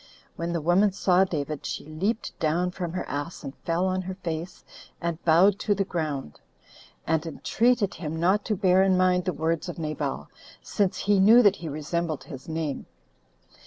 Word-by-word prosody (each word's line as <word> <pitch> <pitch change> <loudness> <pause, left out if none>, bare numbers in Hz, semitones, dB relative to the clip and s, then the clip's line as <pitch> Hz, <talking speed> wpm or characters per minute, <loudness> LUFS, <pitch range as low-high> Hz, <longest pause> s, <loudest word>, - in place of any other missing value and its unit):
When 170 +1 -3
the 170 -1 -1
woman 180 +6 +3
saw 190 -1 +3
David, 150 -4 -4
she - - -5
leaped 190 +10 -2
down 170 +3 +1
from 175 -2 -5
her 185 - -4
ass, 145 +4 -5
and 135 -1 -7
fell 170 +2 -1
on 185 0 0
her 185 0 -6
face, 170 -1 -6 0.3
and 170 -1 -3
bowed 175 +5 +6
down - - -21
to 205 - +1
the 200 - +1
ground; 155 - -4 0.7
and 160 -1 +1
entreated 220 +6 +1
him 160 -1 -5
not 190 +5 +2
to 215 - 0
bear 185 -1 +4
in 190 -1 +3
mind 180 -1 +2
the 185 - +1
words 165 +2 -1
of 175 - -6
Nabal, 150 - -3 0.3
since 200 -3 -1
he 205 -1 +2
knew 225 +6 +7
that 205 -1 +4
he 165 - -6
resembled 155 +1 -3
his 135 -2 -10
name. 160 -3 -3
175 Hz, 185 wpm, -26 LUFS, 155-190 Hz, 0.7 s, knew